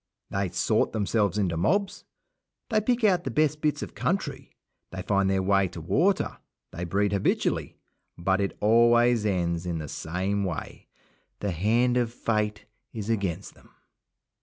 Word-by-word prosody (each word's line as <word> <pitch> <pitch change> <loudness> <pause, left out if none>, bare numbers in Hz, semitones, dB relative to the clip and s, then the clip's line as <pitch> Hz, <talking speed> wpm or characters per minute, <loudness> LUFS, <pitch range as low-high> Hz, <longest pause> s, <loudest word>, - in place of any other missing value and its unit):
They 100 -1 -1
sort 90 +5 +1
themselves 105 -1 +1
into 90 -5 0
mobs, 190 - 0 0.7
they 215 -1 +3
pick 240 +2 0
out 185 -5 +4
the - - -3
best 150 +3 +1
bits 150 -1 0
of - - -8
country, - - -2 0.4
they 95 -1 -6
find 100 0 +1
their 95 -1 +1
way 95 0 +3
to 85 - -9
the 80 - -10
water, 185 - +1 0.3
they 85 +2 -5
breed 100 +3 +1
habitually; 100 - 0 0.4
but 95 +3 +1
it 100 - -2
always 120 +1 +4
ends 85 -3 -1
in 85 -2 -2
the 75 -1 -5
same 95 +7 -2
way. 90 -4 -5 0.5
The 100 - -2
hand 115 +8 +2
of 120 -2 +1
Fate 105 -3 -2 0.3
is 110 0 -4
against 100 -4 -2
them. - - -23
100 Hz, 160 wpm, -27 LUFS, 95-120 Hz, 0.7 s, out